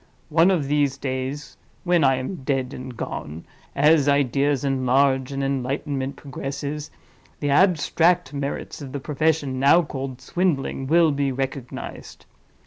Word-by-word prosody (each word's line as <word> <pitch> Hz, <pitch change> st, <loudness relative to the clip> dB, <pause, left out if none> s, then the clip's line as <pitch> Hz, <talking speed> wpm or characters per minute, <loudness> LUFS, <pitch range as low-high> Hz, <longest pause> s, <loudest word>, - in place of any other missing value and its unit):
one 165 Hz, +3 st, +4 dB
of 165 Hz, -8 st, +1 dB
these 145 Hz, -2 st, +1 dB
days 135 Hz, +2 st, -4 dB, 0.3 s
(when 175 Hz, -3 st, +3 dB
I 135 Hz, -1 st, +4 dB
am 130 Hz, +9 st, -4 dB
dead 135 Hz, -1 st, -1 dB
and 125 Hz, -2 st, -8 dB
gone), 80 Hz, -4 st, -6 dB, 0.3 s
as 150 Hz, 0 st, +4 dB
ideas 140 Hz, 0 st, +2 dB
enlarge 135 Hz, 0 st, +2 dB
and 135 Hz, 0 st, -2 dB
enlightenment 135 Hz, +1 st, -2 dB
progresses, 140 Hz, +2 st, -5 dB, 0.5 s
the 145 Hz, -1 st, -1 dB
abstract 170 Hz, -1 st, +3 dB
merits 140 Hz, +2 st, -4 dB
of 135 Hz, -2 st, -8 dB
the 140 Hz, -, -3 dB
profession 150 Hz, -2 st, 0 dB
now 145 Hz, +6 st, +5 dB
called 135 Hz, -3 st, -6 dB
swindling 135 Hz, -3 st, -1 dB
will 165 Hz, +1 st, +4 dB
be 140 Hz, -1 st, 0 dB
recognized. 130 Hz, -1 st, -6 dB
140 Hz, 135 wpm, -23 LUFS, 130-150 Hz, 0.5 s, now